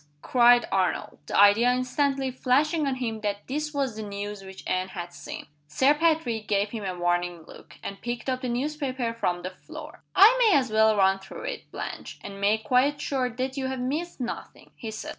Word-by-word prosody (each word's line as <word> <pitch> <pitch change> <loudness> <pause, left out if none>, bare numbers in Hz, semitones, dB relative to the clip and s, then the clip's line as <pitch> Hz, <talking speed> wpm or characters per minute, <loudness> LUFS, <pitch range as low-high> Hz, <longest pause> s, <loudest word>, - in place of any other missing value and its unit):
cried 245 -1 +5
Arnold; 190 -1 0
the - - -1
idea 205 +5 +6
instantly 265 +1 0
flashing 285 +5 +1
on 270 - 0
him 225 -4 -3
that 205 -1 -3
this 300 +3 -3
was 275 -6 -1
the 220 - -5
news 205 0 -5
which 190 0 -11
Anne 185 0 0
had 175 -2 -7
seen. - - -8 0.2
Sir 260 - +4
Patrick 300 -9 +1
gave 205 0 +1
him 225 -3 -5
a 185 -2 -4
warning 175 -1 -1
look, - - -14
and 200 - -6
picked 240 +1 -4
up 255 -1 -1
the 255 - -2
newspaper 260 -2 -2
from 180 -6 -2
the 185 - -4
floor. 310 - -11
"I 425 +6 +8
may 440 -9 +6
as 255 -4 0
well 220 0 +4
run 195 0 +4
through 195 - -10
it, - - -6
Blanche, - - -6
and 195 0 -8
make 215 +2 +2
quite 270 +4 +2
sure 260 -3 -1
that 260 +3 -4
you 265 -1 -1
have 260 -1 -3
missed 300 +8 -3
nothing," 245 -2 -6
he 225 - -7
said. 220 0 -6
240 Hz, 200 wpm, -26 LUFS, 200-270 Hz, 0.2 s, I